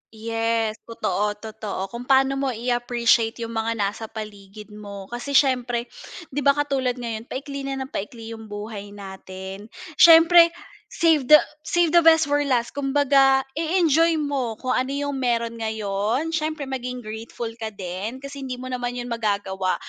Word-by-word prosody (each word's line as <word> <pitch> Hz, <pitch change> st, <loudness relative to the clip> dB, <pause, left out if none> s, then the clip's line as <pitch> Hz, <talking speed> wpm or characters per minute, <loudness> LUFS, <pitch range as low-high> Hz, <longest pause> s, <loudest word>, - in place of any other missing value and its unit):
Yes, 225 Hz, 0 st, -1 dB
totoo, 210 Hz, -2 st, -1 dB
totoo 210 Hz, -3 st, -6 dB
kung 240 Hz, +2 st, -7 dB
paano 270 Hz, 0 st, +3 dB
mo 275 Hz, -, 0 dB
i-appreciate 240 Hz, -1 st, +1 dB
'yong 230 Hz, -, -5 dB
mga 225 Hz, 0 st, -1 dB
nasa 210 Hz, +1 st, -2 dB
paligid 210 Hz, -1 st, -9 dB
mo, 200 Hz, -2 st, -9 dB
kasi 255 Hz, +4 st, -4 dB
siyempre 250 Hz, -3 st, +2 dB, 0.5 s
'di 285 Hz, -, -2 dB
ba 280 Hz, 0 st, +4 dB
katulad 270 Hz, -4 st, 0 dB
ngayon 230 Hz, -2 st, -5 dB
paikli 275 Hz, +1 st, -5 dB
na 270 Hz, -, -2 dB
ng 265 Hz, -, -11 dB
paikli 225 Hz, +2 st, -6 dB
'yong 225 Hz, -1 st, -9 dB
buhay 205 Hz, -1 st, -7 dB
natin, 190 Hz, +1 st, -9 dB, 0.3 s
siyempre 335 Hz, +1 st, +8 dB, 0.4 s
save 315 Hz, -6 st, +2 dB
the 305 Hz, -, +10 dB, 0.3 s
save 345 Hz, -2 st, +2 dB
the 345 Hz, -, +7 dB
best 320 Hz, -1 st, +6 dB
for 290 Hz, -, +3 dB
last, 240 Hz, -3 st, +1 dB
kumbaga 275 Hz, -1 st, +3 dB
e-enjoy 330 Hz, +1 st, +2 dB
mo 275 Hz, -7 st, -2 dB
kung 255 Hz, +2 st, -3 dB
ano 255 Hz, +1 st, +1 dB
'yong 285 Hz, 0 st, -2 dB
meron 235 Hz, -3 st, -1 dB
ngayon. 220 Hz, +7 st, -1 dB
Siyempre 310 Hz, -2 st, -2 dB
maging 250 Hz, -2 st, -5 dB
grateful 225 Hz, +2 st, -6 dB
ka 220 Hz, -, -3 dB
din 205 Hz, +5 st, -6 dB
kasi 275 Hz, 0 st, -7 dB
hindi 255 Hz, -, -4 dB
mo 255 Hz, +1 st, -7 dB
naman 245 Hz, -1 st, -3 dB
'yon 245 Hz, 0 st, -5 dB
magagawa 200 Hz, -4 st, -1 dB
240 Hz, 155 wpm, -23 LUFS, 215-275 Hz, 0.5 s, the